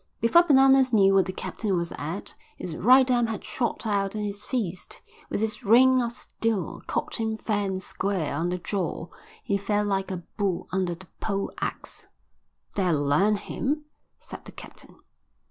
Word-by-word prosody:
Before 230 +10 +6
Bananas 270 -4 +5
knew 195 -4 +5
what 190 -2 +4
the - - -2
captain 200 +1 -3
was 170 0 -2
at, 165 +7 -5 0.2
his 170 -3 -5
right 255 +8 +6
arm 240 -2 +3
had 220 -1 -5
shot 230 +2 -2
out 200 -1 0
and 210 -1 -2
his 205 0 -4
fist, 195 -9 -3 0.3
with 215 - -1
its 215 -1 -2
ring 255 +4 +6
of 235 -1 -1
steel, 225 -3 -3
caught - - -2
him 220 -1 -2
fair 205 -2 -1
and 190 0 -3
square 190 -7 -2
on 165 +5 -1
the 180 - -1
jaw. 180 -2 -3 0.3
He 200 - 0
fell 205 +1 0
like 195 -1 -1
a 180 -2 -5 0.2
bull 195 -4 -1
under 180 -2 0
the 190 +3 -14
pole 200 -2 -2
axe. - - -5 0.7
"That'll 170 -7 +1
learn 195 +9 +3
him," 290 +8 -3 0.3
said - - -10
the - - -10
captain. - - -13
205 Hz, 175 wpm, -26 LUFS, 185-230 Hz, 0.7 s, Before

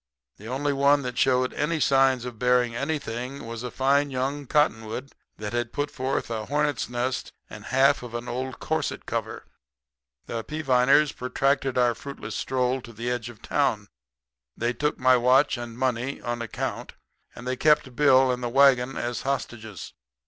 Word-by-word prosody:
The 105 - -11
only 140 +4 -1
one 140 +1 +3
that 125 -1 -4
showed 130 -1 +2
any 155 +2 -1
signs 135 -3 +3
of 120 -3 -7
bearing 125 -1 +2
anything 140 -2 -4
was 115 0 -6
a 125 - -4
fine 140 +3 +2
young 135 +2 -3
cottonwood 125 -3 0 0.3
that 105 +1 -5
had 120 -1 -1
put 145 0 -2
forth 130 -3 -2
a 110 -2 -3
hornet's 145 -3 0
nest 125 +1 -2 0.2
and - - -9
half 135 +2 +3
of 120 -1 -8
an 120 +1 -5
old 130 +1 -4
corset - - -2
cover. - - -4 0.8
"The 115 -1 -4
Peaviners 140 0 +3
protracted 135 +1 0
our 120 -1 +4
fruitless 140 +3 -8
stroll 130 0 0
to 120 - -11
the 120 +3 -3
edge 120 -1 -3
of 115 -3 -14
town. - - 0 0.7
They 120 +1 0
took 150 +4 -1
my 130 0 +5
watch 130 +4 +4
and 120 -1 -7
money 130 +1 -1
on 120 0 -4
account; 115 - -4 0.4
and 120 - -10
they 130 0 -1
kept 150 -3 +2
Bill 130 -2 +5
and 125 0 -3
the 120 - -2
wagon 135 0 +4
as 120 0 -3
hostages. 110 -7 -4
130 Hz, 170 wpm, -26 LUFS, 120-140 Hz, 0.8 s, my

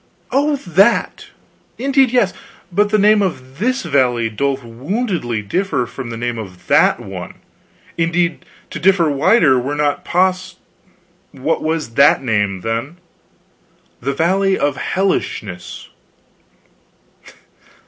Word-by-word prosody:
"Oh, 290 +2 +2
that? 195 - +1 0.5
Indeed 270 0 +2
yes. 230 -7 +2 0.4
But 205 +4 +2
the 215 - +2
name 210 +1 +4
of 135 -7 -4
this 255 +5 0
valley 125 -7 +1
doth 140 +4 -1
woundily 125 - -3
differ 170 - 0
from 125 +1 -8
the 115 - -6
name 120 0 -3
of 95 -4 -10
that - - +3
one; - - -8 0.6
indeed 170 +1 0 0.3
to - - -5
differ 170 -2 +3
wider 140 - +4
were 135 +4 -3
not 145 -1 0
pos 185 +1 0 0.4
" 180 +1 -38
"What 160 +3 0
was 160 -4 -2
that 140 +1 +4
name, 105 -5 0
then?" 115 - -3 1.0
"The 140 +3 -1
Valley 190 +6 +1
of 145 -1 0
Hellishness." 105 - -3
165 Hz, 120 wpm, -18 LUFS, 125-195 Hz, 1.0 s, name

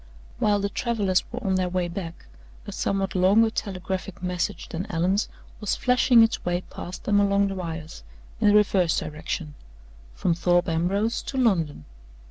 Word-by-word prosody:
While 205 -1 +3
the 200 - -1
travelers 200 -5 0
were 245 +1 -6
on 190 - +1
their 185 -1 +1
way 180 -1 -1
back, 170 -1 -7 0.4
a - - -6
somewhat 195 -1 -1
longer 200 +5 +4
telegraphic 190 -3 -4
message 180 -1 -2
than 175 +5 -5
Allan's 180 +5 +1 0.3
was 210 - -1
flashing 250 -1 +5
its 225 - 0
way 175 0 -1
past 180 - -7
them 205 -1 +3
along 200 0 +3
the - - -3
wires, 165 - -6 0.4
in - - +3
the 205 - +5
reverse 195 -5 +3
direction 155 0 -4 0.6
from 170 - +1
Thorpe 175 +1 +2
Ambrose 195 +8 0
to 270 - -6
London. 170 - +1
190 Hz, 160 wpm, -25 LUFS, 175-205 Hz, 0.6 s, flashing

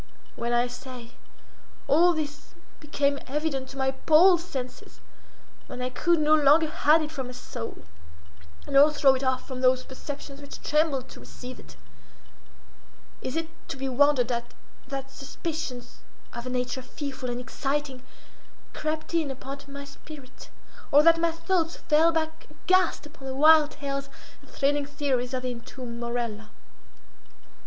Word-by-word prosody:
When, 235 0 -2
I 240 0 +3
say, 245 -1 -9 0.8
all 345 +4 +5
this 300 -2 -5 0.2
became 285 -2 0
evident 275 -2 -2
to 270 - -10
my 265 0 +1
appalled 330 +6 +5
senses—when 260 -4 -10
I 250 0 -2
could 340 +6 +2
no 305 0 +4
longer 305 +1 +5
hide 315 0 +4
it 305 - -5
from 265 -5 -4
my 250 - -8
soul, 240 -2 -7 0.8
nor 280 +2 +7
throw 285 -3 +5
it 265 +1 -3
off 260 -1 0
from 255 -1 -5
those 255 0 +4
perceptions 275 +1 -8
which 285 - -9
trembled 295 -4 +1
to - - -11
receive 255 0 -10
it—is 260 - -15
it 325 0 -1 0.2
to - - -4
be 270 0 -3
wondered 265 -1 +3
at 235 0 -4 0.3
that 270 0 -5
suspicions, 280 -3 -6 0.3
of 235 +1 -6
a - - -2
nature 250 +1 -2
fearful 265 -1 -6
and 240 0 -3
exciting, 270 +1 -3 0.7
crept 310 +1 -3
in 325 -4 +1
upon 270 +1 -6
my 280 0 -8
spirit, 280 -2 -12 0.4
or 290 +2 +7
that 330 0 +6
my 335 0 +3
thoughts 330 0 0
fell 320 +2 +3
back 320 0 -2
aghast 370 -4 +1
upon 295 -3 -11
the 265 - -4
wild 305 +1 +7
tales 275 -1 -4 0.3
and - - -19
thrilling 285 0 0
theories 275 -4 -1
of 255 - -3
the 255 - -1
entombed 235 0 -8
Morella? 235 -3 -3
275 Hz, 145 wpm, -27 LUFS, 255-310 Hz, 0.8 s, nor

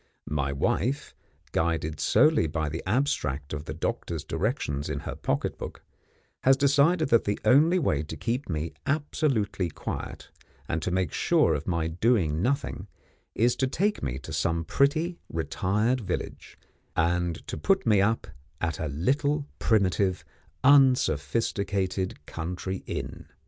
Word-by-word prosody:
My 70 -2 0
wife, 120 - -1 0.4
guided 80 -2 -1
solely 150 - +4
by 80 0 -2
the 80 +2 -4
abstract 75 - 0
of 75 0 -5
the - - -5
doctor's 80 0 -3
directions 80 - -2
in 70 -2 -3
her - - -5
pocket - - -2
book, - - -7 0.6
has 135 +1 +5
decided 145 +4 +3
that 115 - +4
the 100 - -1
only 155 +7 +5
way 75 - +1
to 75 - -7
keep 120 +2 -2
me 80 -1 -2
absolutely 140 - 0
quiet, - - -6 0.4
and 80 - -1
to 90 - -1
make 90 -3 0
sure 80 - +3
of 75 0 -3
my 85 -3 0
doing 85 -3 +1
nothing, 140 +7 -1 0.5
is 120 +3 +3
to 130 - +1
take 200 +10 0
me 65 -1 -2
to 65 - -8
some 85 0 0
pretty, 155 - +1
retired 105 +9 0
village, 100 - -5 0.4
and 85 0 0
to - - -5
put 195 0 +1
me 105 -4 +4
up 110 +3 +1 0.3
at 80 -2 -2
a 80 - -2
little 140 - 0
primitive, 95 -3 +1 0.4
unsophisticated 100 - +2
country 90 +3 -4
inn. - - -5
95 Hz, 140 wpm, -27 LUFS, 80-135 Hz, 0.6 s, has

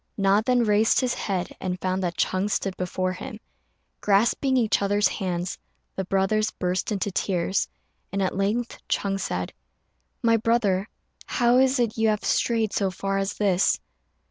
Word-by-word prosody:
Na 195 +1 +3
then 250 0 +3
raised 215 0 +3
his 255 -2 0
head, 185 -3 -3
and 180 -1 -3
found 185 +1 -1
that 175 -2 -2
Ch'êng 190 +2 0
stood 195 -2 -1
before 185 0 -2
him. 180 - -8 0.6
Grasping 235 +6 +2
each 225 -5 +2
other's 205 0 +3
hands, 180 -2 -3 0.4
the 190 - -2
brothers 195 +3 +1
burst 180 +3 -2
into 200 -1 -1
tears, 190 0 0 0.4
and 195 - -2
at 190 -2 0
length 210 +5 -1
Ch'êng 195 -1 0
said, 90 - -3 0.7
"My 230 -1 +4
brother, 215 -4 +1 0.4
how 245 0 +3
is 265 +1 +3
it 230 -2 0
you 225 - +3
have 210 -1 0
strayed 225 -3 +1
so 195 -2 +1
far 195 +1 -2
as 195 0 -2
this?" 195 -3 +2
200 Hz, 160 wpm, -25 LUFS, 185-225 Hz, 0.7 s, My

